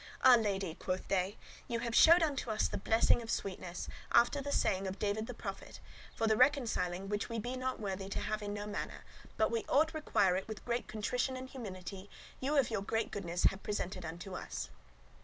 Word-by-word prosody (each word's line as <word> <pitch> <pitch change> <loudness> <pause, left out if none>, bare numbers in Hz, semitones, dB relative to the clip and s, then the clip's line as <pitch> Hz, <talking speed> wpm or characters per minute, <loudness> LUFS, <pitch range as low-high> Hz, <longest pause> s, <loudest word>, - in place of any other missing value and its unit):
"Ah 260 - +9
lady!" 200 -7 +2
quoth 185 +2 -3
they, 190 +2 0 0.3
"ye 235 - -1
have 235 0 -3
showed 335 +7 +8
unto 280 -6 -1
us 215 -1 +1
the - - -4
blessing 225 +3 +3
of 225 - -8
sweetness, 180 -4 -3 0.2
after 240 +4 +4
the 285 +1 -4
saying 190 -6 +1
of 190 +1 -4
David 215 +2 -1
the 245 - -5
prophet; - - -7 0.4
for 225 - 0
the 220 -1 +4
reconciling 215 -8 +2
which 205 +3 -2
we 230 - -3
be 245 +4 -3
not 255 0 -2
worthy 195 -2 -4
to - - -2
have 215 0 -2
in 205 -1 -4
no 205 0 -4
manner, 210 -1 -5 0.3
but 220 - +2
we 230 -1 0
ought 315 +3 +4
require 200 - +2
it 190 - -3
with 220 -2 -7
great 240 0 -1
contrition 245 +4 -1
and 260 0 -8
humility, 195 -4 -7 0.3
ye 265 - -2
of 280 -5 +3
your 210 -3 0
great 225 +2 -1
goodness 175 -3 -3
have 195 - +3
presented 190 -3 -3
unto 170 +4 -6
us. - - -5
215 Hz, 205 wpm, -34 LUFS, 195-245 Hz, 0.4 s, Ah